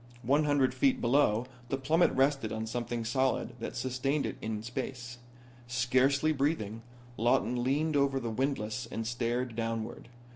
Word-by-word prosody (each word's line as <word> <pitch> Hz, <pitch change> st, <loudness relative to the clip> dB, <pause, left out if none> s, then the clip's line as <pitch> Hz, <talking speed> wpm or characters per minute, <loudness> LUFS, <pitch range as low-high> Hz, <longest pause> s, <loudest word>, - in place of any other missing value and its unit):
One 145 Hz, +6 st, +3 dB
hundred 145 Hz, -3 st, +3 dB
feet 270 Hz, -2 st, +2 dB
below 120 Hz, -3 st, +3 dB
him 130 Hz, -, -17 dB, 0.2 s
the 135 Hz, -, 0 dB
plummet 155 Hz, +6 st, +3 dB
rested 135 Hz, -4 st, +2 dB
on 110 Hz, 0 st, -3 dB
something 120 Hz, 0 st, -3 dB
solid 130 Hz, +3 st, 0 dB
that -, -, -5 dB
sustained 135 Hz, +3 st, -1 dB
it -, -, -3 dB
in 110 Hz, -1 st, -3 dB
space. 125 Hz, 0 st, -5 dB, 0.5 s
Scarcely 130 Hz, +5 st, +2 dB
breathing, 135 Hz, -7 st, -1 dB, 0.4 s
Lawton 120 Hz, +1 st, +2 dB
leaned 150 Hz, +4 st, +1 dB
over 140 Hz, -1 st, +2 dB
the 115 Hz, -3 st, -3 dB
windlass 110 Hz, -3 st, -2 dB
and 115 Hz, -, -4 dB
stared 120 Hz, +1 st, -1 dB
downward. 115 Hz, 0 st, -3 dB
125 Hz, 150 wpm, -31 LUFS, 115-140 Hz, 0.5 s, One